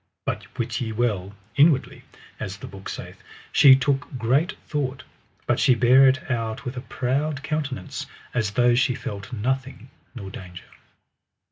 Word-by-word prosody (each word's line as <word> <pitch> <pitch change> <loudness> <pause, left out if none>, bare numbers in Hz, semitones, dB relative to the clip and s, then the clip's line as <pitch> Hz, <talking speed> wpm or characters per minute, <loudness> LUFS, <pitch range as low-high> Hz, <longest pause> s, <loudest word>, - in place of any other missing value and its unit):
But - - -5
wit - - -2
ye 115 -2 -2
well, 105 -4 -1 0.2
inwardly, 145 -2 +3 0.4
as 95 +1 -5
the - - -9
book 95 0 -9
saith, - - -8 0.3
she 135 -3 +8
took 135 0 -1
great 135 - +2
thought, 135 -4 -3 0.4
but - - +1
she 125 - +5
bare 130 +3 +6
it 130 0 +1
out 115 +3 -2
with 125 +1 -4
a 125 - -4
proud 140 +4 -2
countenance 140 - -3 0.3
as 115 -4 0
though 120 +3 +3
she 125 +1 +2
felt 100 +3 -6
nothing 130 +2 -3 0.2
nor 100 -5 -7
danger. 90 -2 -10
125 Hz, 150 wpm, -24 LUFS, 115-135 Hz, 0.4 s, she